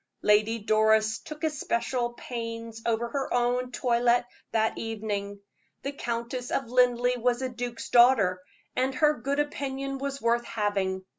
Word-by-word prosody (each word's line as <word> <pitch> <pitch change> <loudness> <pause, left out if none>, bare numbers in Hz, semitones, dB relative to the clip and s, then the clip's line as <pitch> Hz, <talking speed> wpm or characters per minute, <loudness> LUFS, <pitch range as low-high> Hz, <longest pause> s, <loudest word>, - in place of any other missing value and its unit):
Lady 215 +2 +4
Doris 220 0 +3
took 305 +1 -10
especial 245 -5 -1
pains 230 -2 -6
over 230 +1 0
her 275 +1 -3
own 245 +1 +1
toilet 240 0 +2 0.3
that 220 0 +1
evening. 205 -2 -4 0.4
The 275 - -2
Countess 240 -1 -4
of 260 -4 -2
Linleigh 250 0 +3
was 245 +2 +1
a 260 - -1
duke's 245 -1 -5
daughter, 230 -7 +5 0.3
and 260 +1 0
her 300 +2 +4
good 275 +3 -1
opinion 275 -2 -2
was 275 0 -3
worth 235 0 +1
having. 195 -4 -1
240 Hz, 140 wpm, -27 LUFS, 225-255 Hz, 0.4 s, daughter